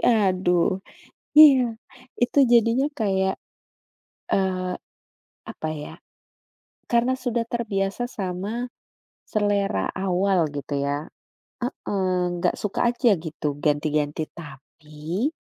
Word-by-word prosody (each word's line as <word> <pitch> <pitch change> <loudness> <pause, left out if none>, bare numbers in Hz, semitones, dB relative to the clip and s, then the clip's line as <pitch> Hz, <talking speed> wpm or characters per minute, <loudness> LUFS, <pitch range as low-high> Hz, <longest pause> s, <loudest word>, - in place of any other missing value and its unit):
aduh. 185 -4 +2 0.6
Iya, 265 -7 +8 0.5
itu 245 +4 +2
jadinya 235 +3 +4
kayak, 190 -3 +1 0.9
eee, 185 -1 0 0.8
apa 155 - -5
ya, - - -8 1.0
karena 240 +2 +3
sudah 235 -2 0
terbiasa 205 -3 -1
sama, 185 -1 -3 0.8
selera 200 - +1
awal 190 0 +1 0.2
gitu 145 +1 -6
ya, 145 +2 -2 0.6
heeh, 200 -6 -2 0.3
nggak 170 - +1
suka 210 - -3
aja 240 0 +2 0.2
gitu, 155 -1 -4 0.2
ganti-ganti, 150 0 0
tapi, 155 - -5
190 Hz, 90 wpm, -24 LUFS, 160-230 Hz, 1.0 s, Iya